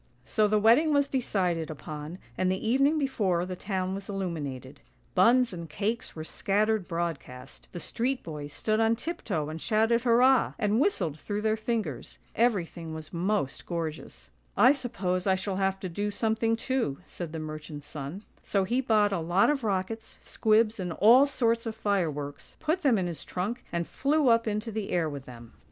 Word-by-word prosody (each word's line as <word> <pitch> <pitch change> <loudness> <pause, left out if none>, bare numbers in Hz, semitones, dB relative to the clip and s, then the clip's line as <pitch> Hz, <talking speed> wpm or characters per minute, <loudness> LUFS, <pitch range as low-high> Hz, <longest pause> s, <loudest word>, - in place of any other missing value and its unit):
So 215 -1 +2
the 215 +1 +2
wedding 240 +9 +5
was 285 -1 +3
decided 180 - 0
upon, 155 +2 -7 0.2
and 185 +5 +1
the 190 +4 -2
evening 275 +6 +3
before 205 - 0
the 185 0 -5
town 185 0 -2
was 195 +1 -6
illuminated. 145 -9 -5 0.3
Buns 235 +5 +4
and 170 -2 -7
cakes 220 +9 -3
were 155 - -5
scattered 210 +4 0
broad 170 -3 -1
cast; 125 +1 -12
the 175 - -6
street 255 +8 -2
boys 150 -3 -6
stood 215 +8 0
on 225 0 +3
tiptoe 225 - -3
and 155 +1 -6
shouted 225 +2 +2
hurrah, 250 +2 +4
and 210 0 +1
whistled 180 - +1
through 205 +4 -3
their 220 0 +2
fingers. 215 - -3 0.2
Everything 175 -8 0
was 160 +1 -9
most 175 -5 -1
gorgeous. 155 - -5
" - - -36
I - - +8
suppose 190 -9 -2
I 190 - +4
shall 190 0 -3
have 195 0 0
to 185 - -3
do 205 +4 -2
something 225 +2 +1
too," 235 - -1
said 170 -3 -6
the 165 - -5
merchant's 155 -1 -7
son; 150 +7 -7 0.2
so 195 -2 0
he 240 +7 +1
bought 210 -5 +3
a 185 - 0
lot 175 - +3
of 275 -4 -2
rockets, 210 +2 -2
squibs, 220 0 +2
and 180 -3 -3
all 240 - +6
sorts 230 -4 +1
of 220 - -4
fireworks, 160 -10 -2
put 320 +4 0
them 265 -8 +4
in 185 - 0
his 170 -3 -5
trunk, 215 +8 -3
and 170 -1 -1
flew 285 - +1
up 230 0 +3
into 215 +2 -2
the 215 -2 -4
air 170 -2 +1
with 140 -3 -6
them. 120 -2 -12
200 Hz, 185 wpm, -28 LUFS, 165-230 Hz, 0.3 s, I